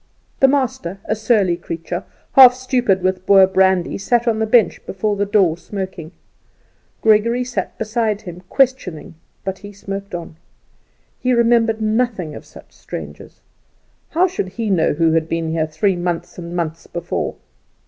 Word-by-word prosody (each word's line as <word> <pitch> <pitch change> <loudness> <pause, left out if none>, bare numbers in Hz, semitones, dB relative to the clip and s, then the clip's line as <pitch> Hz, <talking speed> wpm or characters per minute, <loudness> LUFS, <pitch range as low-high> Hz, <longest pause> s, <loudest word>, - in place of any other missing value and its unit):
The 270 - +6
master, 255 -10 -1
a - - 0
surly 215 -5 +2
creature, 170 +1 -6 0.3
half 255 -2 +8
stupid 250 -7 0
with 185 0 0
Boer 195 -1 +7
brandy, 190 -1 +2
sat 240 +4 +1
on 220 -2 +1
the 220 - 0
bench 220 -4 +3
before 205 +2 -1
the 200 0 -1
door 185 -5 +2
smoking. 185 -5 -6 0.9
Gregory 230 +3 +3
sat 245 0 -4
beside 220 -1 -1
him, 180 -2 -9
questioning, 245 - 0 0.3
but 190 0 -4
he 205 - -10
smoked 200 -1 -6
on. 165 -2 -8 0.8
He 255 0 +1
remembered 230 -2 +3
nothing 215 -7 -1
of - - -10
such - - -16
strangers. - - -9 0.7
How 350 +3 +3
should 360 - -3
he 220 +1 -3
know 170 -4 +2
who 165 +1 +2
had 160 0 0
been 165 -1 -2
there 160 +4 0
months 175 0 -3
and 170 0 -7
months 165 -1 -4
before? 175 0 -3
195 Hz, 150 wpm, -19 LUFS, 175-230 Hz, 0.9 s, half